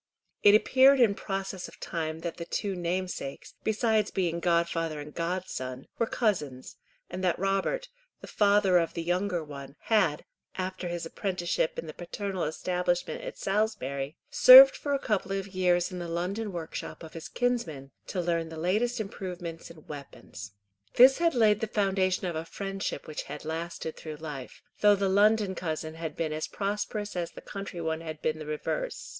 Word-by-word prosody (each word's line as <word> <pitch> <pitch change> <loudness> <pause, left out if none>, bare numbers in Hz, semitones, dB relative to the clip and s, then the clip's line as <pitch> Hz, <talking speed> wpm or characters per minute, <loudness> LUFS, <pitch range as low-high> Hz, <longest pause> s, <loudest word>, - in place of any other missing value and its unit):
It 205 0 +8
appeared 265 +5 +6
in 230 -5 +5
process 195 -1 -4
of - - -15
time 160 -1 -4
that 170 -1 -4
the 170 - -5
two 195 +3 -2
namesakes, 175 -5 -4
besides 220 -1 +2
being 170 -3 -1
godfather 170 -2 0
and 150 +1 -8
godson, 165 -7 -4
were 230 - +2
cousins, 150 - -1 0.3
and 185 +1 -5
that 180 -2 +2
Robert, 195 - 0 0.3
the - - -10
father 200 -3 +4
of 165 -1 -2
the 170 - -2
younger 180 0 0
one, 140 -2 -9 0.2
had, 185 -9 +3 0.3
after 185 -1 -3
his 175 -1 -4
apprenticeship 175 -2 -1
in - - -4
the 155 - -7
paternal 190 +1 -4
establishment 180 - -1
at - - -7
Salisbury, 195 -9 -1 0.2
served - - +10
for 285 - -1
a - - +2
couple 210 -7 -1
of 195 0 -3
years 180 -2 +1
in 180 - -5
the 175 - -4
London 190 +6 -2
workshop 170 -1 -6
of 160 - -10
his 165 - -8
kinsman 175 - -2 0.2
to 185 - -3
learn 170 -2 0
the 160 - -8
latest 215 +9 0
improvements 180 -5 -6
in 165 -2 -14
weapons. 140 -7 -9 0.4
This 260 +4 +8
had 335 -4 +2
laid 215 -3 +4
the 225 - -2
foundation 190 -3 +1
of 175 -2 -2
a 160 - -2
friendship 195 +3 -4
which 155 - -5
had 150 +2 -8
lasted 160 0 -4
through 155 -1 -7
life, 150 -4 -8 0.2
though 205 -1 +6
the 200 0 0
London 205 0 +4
cousin 160 -3 -4
had 160 -2 -5
been 160 -2 -2
as 155 0 -3
prosperous 205 +1 -3
as 175 -1 -2
the - - -12
country 195 -3 -7
one 160 -1 -2
had 155 -2 -6
been 155 0 0
the 155 - -7
reverse. - - -3
180 Hz, 175 wpm, -28 LUFS, 160-205 Hz, 0.4 s, served